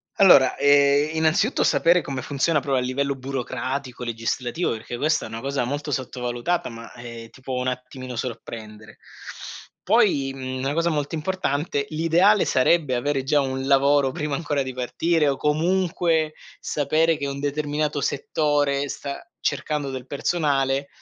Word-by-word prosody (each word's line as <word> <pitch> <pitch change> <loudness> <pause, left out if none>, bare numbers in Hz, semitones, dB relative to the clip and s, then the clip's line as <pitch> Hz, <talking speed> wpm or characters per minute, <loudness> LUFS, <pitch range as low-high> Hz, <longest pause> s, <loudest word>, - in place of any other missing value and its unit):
Allora 175 -9 +6
ehm, 145 +2 +4
innanzitutto 160 - +2
sapere 170 +1 +4
come 135 -2 -5
funziona 150 +3 +1
proprio 135 -2 0
a 125 - -2
livello 140 +2 -1
burocratico, 130 0 -4
legislativo, 120 +6 -2
perché 115 +2 -5
questa 155 +4 +1
è - - -6
una 115 +1 -7
cosa 140 -1 -1
molto 145 +4 -3
sottovalutata 125 +5 -2
ma, 115 0 -10
eh, 115 -1 -9
ti 130 - -17
può 130 -1 -3
un 125 - -2
attimino 125 0 -5
sorprendere. 110 -3 -7 0.9
Poi, 190 - +3
mhmm, 130 -1 -5
una 135 +2 -1
cosa 165 +1 +1
molto 150 -1 -2
importante: 150 -4 -1
l'ideale 165 +6 +3
sarebbe 140 0 +2
avere 140 +2 0
già 145 +2 +2
un 130 0 -3
lavoro 140 0 +4
prima 150 -1 -3
ancora 145 -3 -1
di 130 -1 -6
partire 155 +5 0
o 135 - -1
comunque 165 0 +1 0.3
sapere 155 +3 +1
che 140 - -3
un 140 0 -4
determinato 145 0 -1
settore 145 -1 0
sta 140 +1 -5 0.2
cercando 145 -3 -2
del 130 -1 -7
personale 140 -3 0
140 Hz, 150 wpm, -23 LUFS, 130-155 Hz, 0.9 s, Allora